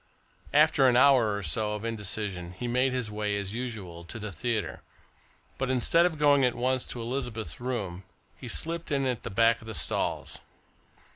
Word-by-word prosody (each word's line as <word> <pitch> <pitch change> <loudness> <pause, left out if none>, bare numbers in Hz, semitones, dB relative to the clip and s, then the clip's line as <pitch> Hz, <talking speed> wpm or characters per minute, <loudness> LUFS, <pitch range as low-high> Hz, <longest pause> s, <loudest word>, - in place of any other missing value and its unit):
After 145 -2 +5
an 120 - +3
hour 125 -6 +5
or 100 - -5
so 105 +7 0
of 105 +2 -6
indecision 105 -5 -3
he 120 +7 -5
made 125 +2 +2
his 125 -4 -2
way, 105 -1 -1
as 100 0 -4
usual, 105 -9 -5
to 100 - -7
the 105 -1 -5
theatre, 110 +5 -2 0.8
but 135 0 -1
instead 150 +7 +4
of 160 -3 -5
going 145 -2 +5
at 125 -1 +2
once 130 +1 0
to 120 - -6
Elizabeth's 120 -2 -4
room, 105 -8 -3 0.3
he - - -10
slipped 165 0 -2
in 140 -1 +1
at 125 -4 -1
the - - -5
back 115 +3 +3
of 110 - -12
the 110 - -5
stalls. - - -2
120 Hz, 185 wpm, -28 LUFS, 105-130 Hz, 0.8 s, After